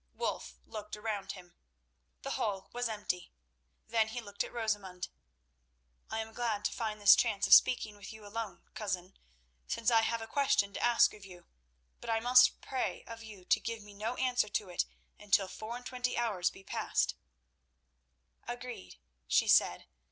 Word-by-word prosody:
Wulf 65 - -3
looked 210 -1 -7
round 210 -2 -3
him. 180 -2 -13 0.7
The - - -3
hall 195 -2 -2
was 245 -1 -1
empty. 205 -4 -3 0.5
Then 225 -1 +2
he 225 +2 -5
looked 205 -3 -3
at - - -8
Rosamund. 205 -6 -3 1.0
"I 225 - -2
am 220 0 -8
glad 220 -4 -1
to - - +2
find 215 -2 -3
this 205 0 +9
chance 205 -4 +1
of - - +6
speaking 215 -4 +6
with 200 - -9
you 220 -1 -12
alone, 205 -3 -5
Cousin, 185 -3 -4 0.5
since 230 +1 +1
I 225 -1 +6
have 230 +1 0
a 225 - -6
question 225 -5 +2
to - - -4
ask 240 0 +5
of 210 - -13
you; 180 -2 -12 0.5
but 235 - -8
I 225 0 +2
must 250 +2 +6
pray 260 - -3
of 230 0 -9
you 210 -5 -11
to - - +3
give 230 -2 -5
me 205 0 -13
no 215 +4 -3
answer 250 -5 +1
to 205 -1 -2
it 175 - 0 0.3
until 200 -1 +2
four 220 +5 -6
and 245 - -13
twenty 250 -1 -2
hours 205 -7 +1
be 195 - -14
passed." - - 0 1.3
"Agreed," 240 - -7 0.3
she - - +3
said. - - +4
220 Hz, 175 wpm, -32 LUFS, 200-235 Hz, 1.3 s, this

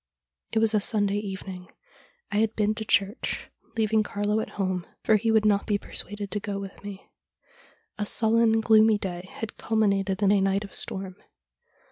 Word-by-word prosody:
It - - -1
was 220 0 +4
a 215 - +4
Sunday 205 -1 +1
evening. 190 -2 -7 0.6
I 205 - 0
had 220 +1 +1
been 210 0 +1
to 220 0 -4
church, 200 0 0 0.3
leaving 220 0 +3
Carlo 205 +1 -1
at - - -3
home, 185 -3 -1 0.2
for 220 - +4
he 225 +2 +1
would 220 -1 +3
not 205 -1 +2
be 205 -2 +2
persuaded 205 0 -5
to 210 - -1
go 200 -1 -4
with 195 0 -9
me. 200 -1 -9 0.9
A 210 - 0
sullen, 225 0 +3
gloomy 220 -1 +5
day 185 -2 -6
had 225 - -6
culminated 200 -3 +1
in 200 - +5
a 205 -1 +4
night 195 +1 +1
of 200 - -10
storm. 190 -1 -4
205 Hz, 175 wpm, -26 LUFS, 195-220 Hz, 0.9 s, gloomy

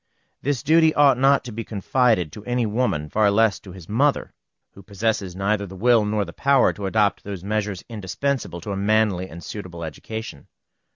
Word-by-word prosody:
This 135 -3 -1
duty 160 +1 +4
ought 140 -4 +5
not 135 +1 +4
to 125 - -8
be 115 +1 -5
confided 110 - +1
to 105 - -10
any 120 -1 0
woman, 105 -9 -1
far 105 +5 +2
less 110 0 +2
to 95 - -12
his 90 -3 -12
mother, 135 +7 +1 0.4
who 100 - -14
possesses 100 -2 -2
neither 100 +1 -1
the 95 - -10
will 115 +2 +3
nor 105 -1 0
the - - -10
power 140 -1 +3
to 100 -2 -5
adopt 100 -1 +1
those 100 -3 -7
measures 105 -2 -2
indispensable 110 -1 -3
to 105 - -6
a - - -2
manly 100 -2 +1
and 85 +1 -10
suitable 90 -5 -7
education. 80 +1 -7
105 Hz, 185 wpm, -23 LUFS, 95-120 Hz, 0.4 s, ought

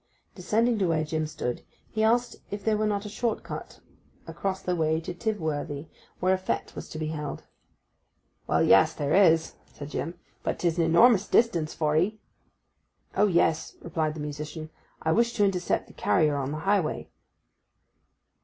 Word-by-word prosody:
Descending 220 +5 +1
to 190 - +2
where 160 -2 +1
Jim 155 0 -2
stood, 125 -5 -4 0.3
he 220 - -1
asked 240 +2 +2
if 205 -1 -6
there 220 -1 +3
were 215 0 +1
not 205 0 -1
a - - -4
short 220 +2 -2
cut - - -8 0.4
across 190 -1 -3
that 180 - 0
way 160 -1 +1
to 165 +2 -6
Tivworthy, 160 -7 -3 0.3
where 185 +1 +3
a 190 - 0
fête 185 - -3
was - - -8
to - - -7
be 155 -1 -2
held. 150 -3 -5 1.0
'Well, - - +3
yes, - - +5
there 145 +1 -1
is,' 165 -4 +4 0.2
said 145 0 -9
Jim. 165 +3 -3 0.3
'But - - -2
'tis 170 -1 0
an 165 - +4
enormous 200 +5 +5
distance 170 -10 +2
for 150 -1 +1
'ee.' 200 +7 +1 1.0
'Oh, 210 - +4
yes,' 170 -4 +1
replied 160 -2 -2
the 155 - -6
musician. 150 +2 -6 0.3
'I 160 - +2
wish 235 +6 +2
to 210 -4 +3
intercept 180 -3 0
the - - -17
carrier 155 -5 +2
on 140 -1 -2
the 155 - -3
highway. 195 -5 0
170 Hz, 170 wpm, -27 LUFS, 155-205 Hz, 1.0 s, yes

